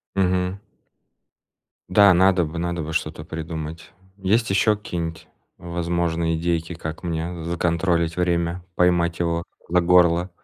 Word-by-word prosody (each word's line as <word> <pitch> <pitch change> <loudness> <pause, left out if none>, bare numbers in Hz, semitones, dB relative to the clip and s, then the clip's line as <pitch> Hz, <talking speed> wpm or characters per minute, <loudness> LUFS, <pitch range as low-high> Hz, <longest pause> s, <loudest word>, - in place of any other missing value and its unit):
Мгм. 90 0 0 1.3
Да, 100 +1 +6
надо 90 0 +4
бы 80 +2 -5
надо 85 -1 -2
бы 80 +1 -5
что-то 80 -1 -3
придумать. 80 +1 -6 0.3
Есть 105 +3 +1
еще 105 +2 +3
какие-нибудь 85 -6 -5 0.3
возможные 85 -1 -1
идейки, 85 0 -1
как 80 -1 -6
мне 85 0 -4
законтролить 85 0 0
время, 85 0 0
поймать 85 -1 +2
его 85 0 -1 0.3
за 90 +1 +3
горло? 90 0 +4
85 Hz, 120 wpm, -23 LUFS, 80-90 Hz, 1.3 s, Да